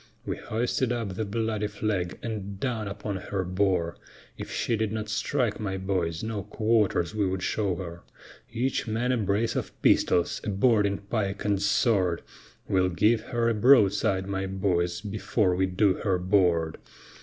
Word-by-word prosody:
We - - -2
hoisted 120 +2 -1
up 115 -4 -2
the 110 +4 -3
bloody 110 0 -1
flag 100 -4 -2
and 100 -4 -5
down 115 -4 -2
upon 100 0 -4
her 95 0 -3
bore, 90 -2 0 0.4
If - - -7
she 115 - 0
did 110 -1 -1
not 110 -1 -4
strike, 115 +2 0
my 95 -3 -2
boys, 90 -3 -2
no 110 -2 -3
quarters 105 -3 +1
we 105 -2 +1
would 95 0 -2
show 100 -4 0
her; 85 -2 -7 0.5
Each 125 +1 -1
man 115 +3 0
a 125 - +2
brace 105 +1 0
of - - -4
pistols, 85 0 +3
a - - -3
boarding 100 -1 +3
pike 100 -1 -3
and 100 -2 +1
sword, 100 -4 +2 0.4
We'll 95 -1 +2
give 105 +6 +3
her 120 -1 0
a 115 - +3
broadside, 105 -4 +4
my 95 0 -2
boys, 90 -2 0
before 105 -2 0
we 95 +1 +1
do 95 +1 +3
her 95 -1 0
board. 90 -3 +2
100 Hz, 165 wpm, -27 LUFS, 95-110 Hz, 0.5 s, broadside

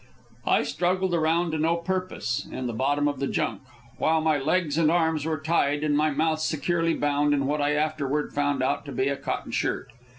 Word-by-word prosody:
I - - +4
struggled 185 +1 0
around 165 +1 +2
to 155 - -2
no 165 +2 +2
purpose 185 -7 -2
in 130 - -4
the 120 - -2
bottom 145 +5 +1
of 145 -2 -2
the 140 - -1
junk, - - -1 0.4
while 160 0 +3
my 155 -2 +2
legs 150 +1 0
and 160 -2 +4
arms 160 -2 +1
were 160 -2 -1
tied 150 -2 +1
and 150 -1 +1
my 155 +1 +3
mouth 155 +2 0
securely 165 +2 0
bound 145 0 +2
in 140 -1 0
what 150 +2 0
I 145 +1 +2
afterward 150 -1 -1
found 145 -2 0
out 130 - 0
to 140 - -7
be 130 +1 0
a 140 - 0
cotton - - -4
shirt. - - -2
150 Hz, 205 wpm, -26 LUFS, 145-165 Hz, 0.4 s, I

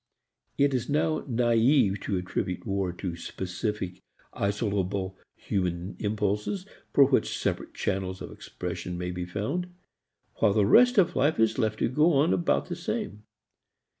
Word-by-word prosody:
It 140 0 +3
is 125 -2 -1
now 155 +2 +1
naive 120 -3 +3
to 95 - -2
attribute 90 0 -3
war 100 -3 -1
to 90 0 -5
specific 90 +2 -4 0.3
isolable 100 -2 -1 0.2
human 90 -1 -2
impulses 105 - -1 0.3
for 140 - +7
which 135 -1 +1
separate - - -2
channels 95 -1 -2
of - - -7
expression 90 -1 -6
may 90 0 -3
be 90 0 -4
found, 110 - -3 0.7
while 105 -3 +3
the 105 -1 +3
rest 245 - +6
of 185 -4 +4
life 145 0 +2
is 110 +3 +2
left 110 -2 +1
to - - +1
go 150 +8 +3
on 145 +4 +3
about 170 - +1
the 175 - -4
same. 175 - -4
105 Hz, 145 wpm, -27 LUFS, 95-140 Hz, 0.7 s, for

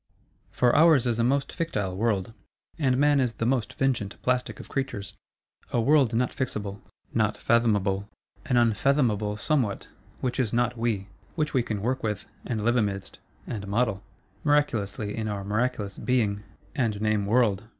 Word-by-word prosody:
For 125 -1 +2
ours 155 -4 +6
is 120 -2 0
a - - +3
most 135 +3 +1
fictile 105 - -2
world; 105 -1 0 0.5
and 130 -4 +2
man 145 0 +4
is 125 -3 +1
the 115 - -3
most 125 -2 +1
fingent 120 -7 -1
plastic 125 0 0
of - - -9
creatures. 105 -8 -3 0.6
A 120 - +1
world 130 -1 +4
not 125 +2 +1
fixable; 105 -6 -3 0.3
not - - +1
fathomable! 105 -4 +1 0.4
An 125 -4 +2
unfathomable 115 -2 +2
Somewhat, 120 -5 0 0.3
which 125 -1 -2
is 120 -4 0
Not 120 +1 +1
we; 115 -4 -1 0.3
which 155 -2 -1
we 130 - +3
can 105 -3 -4
work 130 +3 0
with, 105 -2 -2 0.2
and 110 -4 -2
live 120 +1 +3
amidst,—and 100 0 -4
model, 105 -1 0 0.4
miraculously 110 -8 +1
in 110 -1 -3
our 100 -2 -3
miraculous 105 0 -1
Being, 110 -5 +1 0.3
and 115 -8 0
name 105 -2 +1
World. 110 -3 +2
115 Hz, 155 wpm, -26 LUFS, 105-130 Hz, 0.6 s, ours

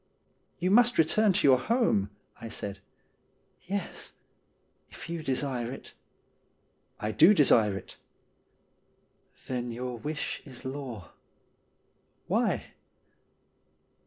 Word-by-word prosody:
' - - -42 0.2
You 180 +2 +1
must 240 +3 +5
return 205 +7 +4
to 185 -6 +2
your 130 -2 +6
home,' 175 - +1 0.3
I 115 - -8
said. 100 -3 -5 0.5
' - - -42
Yes, 195 -1 -5 0.8
if - - -10
you 170 -1 -3
desire 130 -4 -2
it.' 135 - -9 0.6
' - - -43
I 105 - -2
do 170 - +6
desire 110 - +4
it.' 95 - -11 0.8
' - - -31
Then 125 -2 -3
your 125 0 -5
wish 150 +4 -4
is 130 -4 -9
law.' 130 -9 -6 0.6
' - - -43
Why - - 0
130 Hz, 120 wpm, -29 LUFS, 115-170 Hz, 0.8 s, your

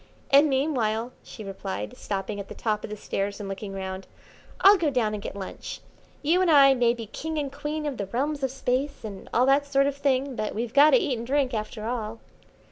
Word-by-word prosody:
"And 285 +2 +7
meanwhile," 250 -5 0
she 220 - -10
replied, 105 - -5
stopping 200 +1 -4
at 200 - -6
the - - -9
top 215 -2 -1
of - - -5
the 210 - -6
stairs 200 0 -3
and 205 - -5
looking 195 +1 -5
round, 190 0 -5 0.5
"I'll 400 +2 +9
go 340 -6 +1
down 240 -6 0
and 210 - -4
get - - -6
lunch. 195 -2 -7 0.4
You 335 +5 +3
and 370 - +3
I 280 -3 +7
may 240 -2 +2
be 230 -2 -6
king 315 +9 -5
and 285 -2 -2
queen 295 +2 -4
of 285 -4 -3
the 200 - -3
realms 280 +7 -1
of 265 - 0
Space, 270 +2 -2
and 200 -3 -8
all 245 - +3
that 280 +2 +3
sort 275 0 +3
of 280 -1 0
thing, 275 -1 0
but 215 -2 -3
we've 230 +1 -3
got 290 +2 +7
to - - +6
eat 290 - -1
and 235 - -6
drink, 270 -1 +1
after 215 0 -4
all." 225 -2 -3
250 Hz, 225 wpm, -26 LUFS, 210-285 Hz, 0.5 s, I'll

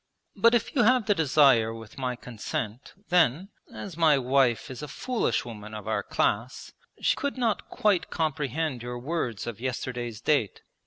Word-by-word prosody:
'But 230 +1 +5
if 235 - 0
you 255 - +4
have 245 0 +4
the 210 - +4
desire 135 - +4
with 115 +3 -11
my 125 -1 -1
consent, 115 0 -5 0.2
then, 175 +1 +3 0.2
as 195 -5 -7
my 160 -3 +4
wife 130 -2 +2
is 130 - -7
a 150 - -5
foolish 240 - -1
woman 110 -2 -8
of 105 -2 -8
our - - 0
class, 115 +5 -1 0.3
she - - +2
could 285 -2 -3
not 230 -4 -1
quite 205 -4 +1
comprehend 150 -3 -2
your 120 0 -5
words 125 - -3
of 120 -2 -6
yesterday's 125 -3 -4
date. 120 -4 0
135 Hz, 165 wpm, -27 LUFS, 120-170 Hz, 0.3 s, But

